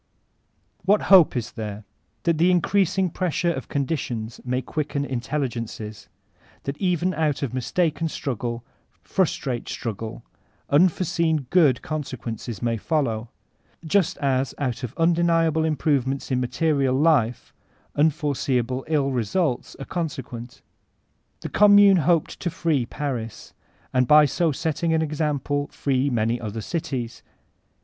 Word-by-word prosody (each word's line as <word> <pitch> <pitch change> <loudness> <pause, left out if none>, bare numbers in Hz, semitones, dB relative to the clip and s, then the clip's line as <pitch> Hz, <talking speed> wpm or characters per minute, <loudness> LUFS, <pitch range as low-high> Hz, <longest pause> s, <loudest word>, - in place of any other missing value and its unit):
What 200 +4 +3
hope 175 -8 +7
is 120 - -3
there? 105 -1 -6 0.4
That 165 -2 +1
the 175 +2 +5
increasing 185 0 +2
pressure 175 -1 0
of - - -6
conditions 130 -6 -3
may 125 +1 -1
quicken 145 -2 -2
intelligences; 120 -5 -4 0.5
that 140 - -3
even 180 -1 +1
out 150 -3 0
of 130 - -3
mistaken 160 +5 0
struggle, 120 -4 -4 0.4
frustrate 135 -9 -1
struggle, 110 +1 -5 0.5
unforeseen 165 -1 +2
good 150 -9 +4
consequences 120 -7 -5
may 115 -1 0
flow, 120 -4 -1 0.6
just 190 +2 +1
as 135 -2 0
out 130 -4 -2
of 125 -4 -6
undeniable 165 -1 +2
im* 160 -1 +1
provements 135 -2 0
in 125 - +2
material 135 +1 +1
life, 135 -6 +2 0.4
unforeseeable 140 -5 0
ill 145 -3 +1
results 130 - -1
are 135 - -8
consequent 130 -8 -5 0.8
The - - -5
0>mmune 205 -2 +6
hoped 170 -1 +1
to 175 - -2
free 160 -8 0
Paris, 125 -7 -5 0.4
and 125 -1 +3
by 150 +2 +7
so 160 +4 +1
setting 160 +2 -1
an 160 - +2
example 145 -2 -1
free 135 -1 0
many 120 -1 0
other 110 0 -4
cities. 135 -6 -4
145 Hz, 125 wpm, -24 LUFS, 125-165 Hz, 0.8 s, hope